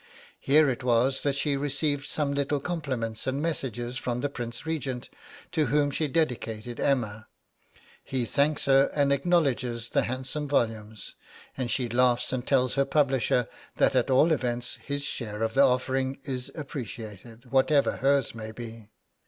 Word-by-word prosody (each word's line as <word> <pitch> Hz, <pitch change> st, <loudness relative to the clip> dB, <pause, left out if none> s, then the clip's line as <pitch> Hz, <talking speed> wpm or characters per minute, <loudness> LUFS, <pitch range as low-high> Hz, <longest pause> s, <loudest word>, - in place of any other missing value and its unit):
Here 150 Hz, +2 st, +4 dB
it 130 Hz, -2 st, -2 dB
was 125 Hz, +2 st, +2 dB
that 140 Hz, -1 st, 0 dB
she 140 Hz, 0 st, 0 dB
received 145 Hz, +1 st, 0 dB
some 145 Hz, -2 st, 0 dB
little 140 Hz, +1 st, 0 dB
compliments 130 Hz, -9 st, -3 dB
and 135 Hz, +1 st, 0 dB
messages 125 Hz, -6 st, -2 dB
from 125 Hz, 0 st, -2 dB
the 145 Hz, -, 0 dB
Prince 120 Hz, 0 st, -6 dB
Regent, 135 Hz, -6 st, -3 dB, 0.4 s
to 155 Hz, -3 st, +1 dB
whom 145 Hz, +3 st, +2 dB
she 155 Hz, +2 st, 0 dB
dedicated 120 Hz, -6 st, -2 dB
'Emma.' 110 Hz, -6 st, 0 dB, 0.8 s
He 130 Hz, -3 st, -2 dB
thanks 145 Hz, +4 st, +1 dB
her 135 Hz, 0 st, +5 dB
and 140 Hz, -1 st, +3 dB
acknowledges 135 Hz, -7 st, +1 dB
the -, -, +3 dB
handsome 130 Hz, +4 st, -3 dB
volumes, 110 Hz, -6 st, -2 dB, 0.4 s
and 130 Hz, -3 st, -3 dB
she 120 Hz, +2 st, 0 dB
laughs 125 Hz, +1 st, +2 dB
and 125 Hz, -1 st, -3 dB
tells 130 Hz, -2 st, +3 dB
her 140 Hz, -, +3 dB
publisher 135 Hz, -4 st, +2 dB, 0.3 s
that -, -, +3 dB
at 125 Hz, +1 st, +2 dB
all 135 Hz, +6 st, +5 dB
events 125 Hz, -4 st, -1 dB
his 140 Hz, 0 st, -3 dB
share 115 Hz, -6 st, -3 dB
of 110 Hz, 0 st, -1 dB
the 135 Hz, -, +4 dB
offering 130 Hz, 0 st, +2 dB
is 130 Hz, -3 st, -4 dB
appreciated, 120 Hz, -, -8 dB
whatever 140 Hz, +2 st, +3 dB
hers 140 Hz, -1 st, +2 dB
may 110 Hz, -1 st, -7 dB
be! 115 Hz, -2 st, -9 dB
130 Hz, 155 wpm, -27 LUFS, 120-140 Hz, 0.8 s, her